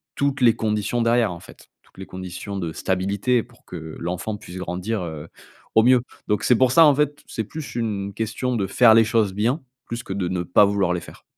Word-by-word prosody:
toutes 140 -1 0
les 115 -3 +5
conditions 105 +2 -1
derrière 115 -3 +2
en 85 - -9
fait, - - -16
toutes - - -29
les 95 - -8
conditions 95 +2 -7
de 85 -4 -3
stabilité 100 +8 0
pour - - -22
que 80 0 -8
l'enfant 90 +5 -3
puisse 90 -2 -11
grandir, 90 +4 -3
heu, 80 -2 -7 0.5
au 110 - +6
mieux. 125 +1 +6 0.3
Donc, 105 - +1
c'est 125 - +4
pour 130 0 +3
ça, 165 +5 +7
en 145 -2 +5
fait, 145 0 0
c'est 110 - -3
plus 155 +3 -8
une 100 -4 -2
question 115 +4 -2
de 100 -3 -1
faire 110 +3 +6
les 115 - +6
choses 110 -3 +1
bien, 120 - 0 0.2
plus 115 0 -5
que 95 - -5
de 95 -3 -2
ne 90 -1 -2
pas 90 +4 +4
vouloir 100 -3 +1
les 90 - -3
faire. - - -14
105 Hz, 220 wpm, -23 LUFS, 95-120 Hz, 0.5 s, ça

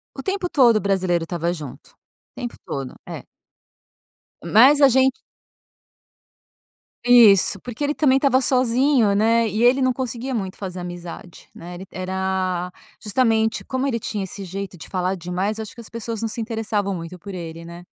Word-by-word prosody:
O - - -6
tempo 385 -1 -2
todo 245 -7 +5
o - - +2
brasileiro 185 -4 0
estava 170 0 -2
junto. 145 -6 -10
O - - -39
tempo 240 -1 -5
todo, 135 -2 -5
é. - - -7 1.2
Mas 250 - +6
a 280 - +8
gente 265 +1 +4 1.9
Isso, 220 -6 +6
porque 245 +5 -7
ele 290 +1 0
também 280 -4 +3
estava 270 -1 +3
sozinho, 255 -2 +3
né, 225 +3 +3
e 215 +3 0
ele 260 +2 +4
não 255 0 +3
conseguia 255 0 -4
muito 195 -6 -3
fazer 185 -2 -6
amizade, 175 0 -9
né? 175 +1 -10
Ele 180 +2 -8
era 185 -1 -2 0.3
justamente 220 0 +1
como 260 +1 -2
ele 235 -3 -1
tinha 210 -2 -4
esse 195 +1 -7
jeito 190 0 -6
de - - -11
falar 185 0 -1
demais, 185 +5 -3
acho 220 -2 -7
que - - -11
as 230 - -11
pessoas 230 -1 -5
não 225 - -1
se 225 - -5
interessavam 215 -3 -2
muito 170 +1 -7
por 195 +3 -9
ele, 165 -2 -7
né? 170 +1 -10
210 Hz, 170 wpm, -22 LUFS, 180-245 Hz, 1.9 s, a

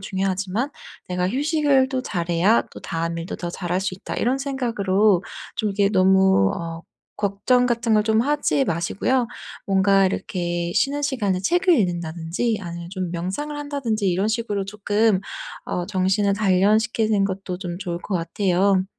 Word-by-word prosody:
중요하지만 195 +6 -2 0.4
내가 180 0 0
휴식을 285 - +2
또 260 -1 -1
잘 175 -9 -3
해야 185 +7 +4
또 - - -10
다음 165 0 -3
일도 165 - -5
더 175 - -4
잘 175 0 -4
할 185 - +1
수 190 -1 -2
있다.' 190 - -7
이런 255 +3 +1
생각으로 215 -8 +1 0.3
좀 215 -3 0
이게 200 0 +2
너무 190 - +4
어 165 0 -6 0.3
걱정 215 +5 +2
같은 230 -2 +1
걸 210 0 +3
좀 220 0 +3
하지 260 - +1
마시고요. 200 +9 0 0.4
뭔가 195 0 +4
이렇게 175 -2 -2
쉬는 290 +1 +1
시간에 210 -10 0
책을 350 - +3
읽는다든지 175 +5 -1
아니면 170 0 -6
좀 185 -3 -3
명상을 190 - -4
한다든지 260 -9 -2
이런 190 +4 +1
식으로 215 -3 -1
쪼끔 205 0 +1 0.4
어 175 - -2
정신을 195 +1 +1
단련시키는 215 +1 +2
것도 190 -2 -4
좀 175 -3 -5
좋을 175 -3 -4
것 190 - -5
같아요. 185 +2 +1
195 Hz, 320 characters per minute, -23 LUFS, 180-230 Hz, 0.4 s, 해야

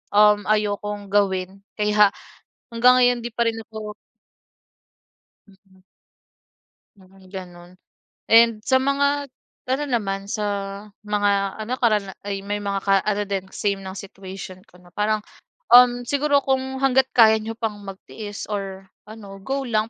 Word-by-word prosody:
um, 210 0 +5
ayokong 210 -1 -1
gawin 195 -1 0 0.2
kaya 210 -1 +4 0.6
hanggang 245 +2 +5
ngayon 245 0 +4
hindi 240 - -5
pa 235 -1 +1
rin 225 - 0
ako 215 -1 -8 1.5
Mm. 190 -1 -24 1.2
Hmm, 190 -1 -20 0.2
gano'n 180 -2 -10 0.5
and 230 -1 +4
sa 260 -1 +3
mga 280 +1 0 0.4
ano 265 +3 0
naman 200 -7 -2
sa 210 +1 -3 0.6
mga 205 -1 +1
ano 220 +4 -4
kara 230 -4 +3 0.3
ay 200 -1 -3
may 205 +1 -3
mga 200 -1 -3 0.2
ano 210 -1 0
din 195 -1 -2
same 200 -1 -1
ng 190 - -6
situation 190 -1 -10
ko 180 -3 -21
na 175 - -19
parang, 210 +3 -1 0.5
um, 245 0 +7
siguro 285 +2 +2
kung 265 0 -2
hangga't 265 -1 +4
kaya 220 -2 +6
n'yo 225 +1 -5
pang 225 -3 -3
magtiis 205 +2 -8
or 195 -2 -5 0.2
ano 205 -2 -11
go 270 +7 -2
lang 220 -2 0
210 Hz, 135 wpm, -22 LUFS, 195-235 Hz, 1.5 s, um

